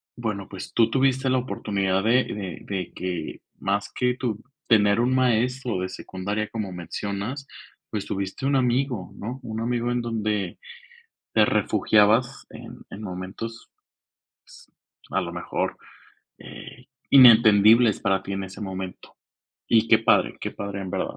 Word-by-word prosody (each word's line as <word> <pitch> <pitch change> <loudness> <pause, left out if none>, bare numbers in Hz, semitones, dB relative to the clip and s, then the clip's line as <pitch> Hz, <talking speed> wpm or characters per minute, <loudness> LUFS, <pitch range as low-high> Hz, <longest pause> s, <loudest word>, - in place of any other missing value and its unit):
bueno, 105 -5 -4
pues, 95 - -8
tú 115 -1 +3
tuviste 130 +1 +1
la 130 0 +2
oportunidad 100 -6 -1
de 120 +4 +4
de 95 -4 -6 0.2
de 90 -2 -4
que 90 -1 -5 0.2
más 100 +1 -1
que 125 -1 0
tú 115 -5 -2 0.3
tener 105 -1 +4
un 125 +2 +1
maestro 125 -2 +1
de 95 - -3
secundaria, 100 +3 -4
como 105 -4 -4
mencionas, 100 - -5 0.4
pues, 105 -2 -4
tuviste 95 +6 -4
un 140 0 +2
amigo, 125 -5 0
¿no?, 120 +5 -6
un 110 -2 -5
amigo 120 +1 -1
en 120 - 0
donde 105 -5 -2 0.7
te - - +5
refugiabas 110 +4 +2
en - - -11
en 105 - -9
momentos, 100 +4 -7 1.4
pues, - - -1
a - - +2
lo - - -5
mejor, - - -3 0.6
eh, 125 - -12 0.2
inentendibles 115 -3 +7
para 95 -1 +1
tí 100 - -5
en 95 0 -3
ese 95 +2 -9
momento, 95 -2 -7 0.6
y 115 0 +4
qué 110 - +6
padre, 115 - +2
qué - - -3
padre, 100 -1 -6
en 95 - -6
verdad. - - -3
110 Hz, 145 wpm, -24 LUFS, 100-120 Hz, 1.4 s, inentendibles